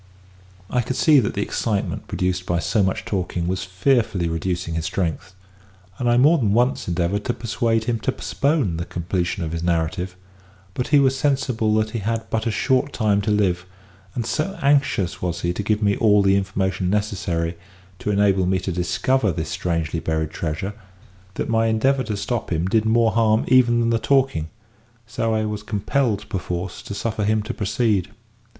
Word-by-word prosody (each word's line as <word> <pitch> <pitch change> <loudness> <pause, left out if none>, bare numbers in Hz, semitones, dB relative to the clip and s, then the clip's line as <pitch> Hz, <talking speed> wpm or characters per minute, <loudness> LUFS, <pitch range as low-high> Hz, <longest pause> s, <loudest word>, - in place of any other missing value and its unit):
I 125 - +2
could 130 +2 -3
see 150 -1 +5
that 105 - -1
the 100 - 0
excitement 105 -2 -2
produced 90 0 -2
by 85 - +1
so 95 +7 +1
much 95 -1 0
talking 90 -3 -2
was 95 +1 -1
fearfully 95 -1 +1
reducing 85 +1 -2
his 80 0 -2
strength, 90 +2 -3 0.6
and 120 - +1
I 120 - +4
more 150 +6 +5
than 105 -5 +1
once 120 +3 +1
endeavoured 90 +4 0
to 120 - 0
persuade 115 0 0
him 115 0 -1
to 130 - 0
postpone 140 - 0
the 85 - -3
completion 90 +3 -2
of 80 - -3
his 85 0 -3
narrative; 85 +2 -1 0.6
but 125 - -2
he 150 - +4
was 135 -1 +4
sensible 130 -6 +1
that 110 0 +1
he 115 - -3
had 115 +2 -2
but 110 +1 0
a - - +2
short 130 +4 +1
time 105 -3 +2
to 105 - -2
live, 95 -4 +1 0.5
and 120 - -2
so 170 - -2
anxious 140 -10 +2
was 85 -1 -2
he 85 0 0
to 95 - -3
give 105 +1 0
me 100 -1 +3
all 105 -3 +4
the 95 0 +4
information 95 -1 -1
necessary 90 -5 -1 0.4
to - - -3
enable 100 -2 +3
me 95 0 +2
to 95 +1 -3
discover 95 +7 +1
this - - -4
strangely 85 -2 -2
buried 80 -1 -2
treasure, 85 +5 -3 0.6
that - - -2
my 115 -1 +2
endeavour 130 +5 +2
to 105 -2 -3
stop 120 0 -3
him 85 +1 0
did 110 +3 +2
more 115 0 +3
harm 110 -1 +2
even 120 -2 +5
than 115 0 +1
the 115 - +2
talking, 130 - +1 0.6
so 115 -1 -1
I 110 0 0
was 105 -1 -3
compelled 105 +1 -1
perforce 90 -2 -4
to 100 - -7
suffer 110 0 -2
him 110 +1 +1
to 110 - -4
proceed. 105 -2 0
105 Hz, 185 wpm, -22 LUFS, 90-115 Hz, 0.6 s, see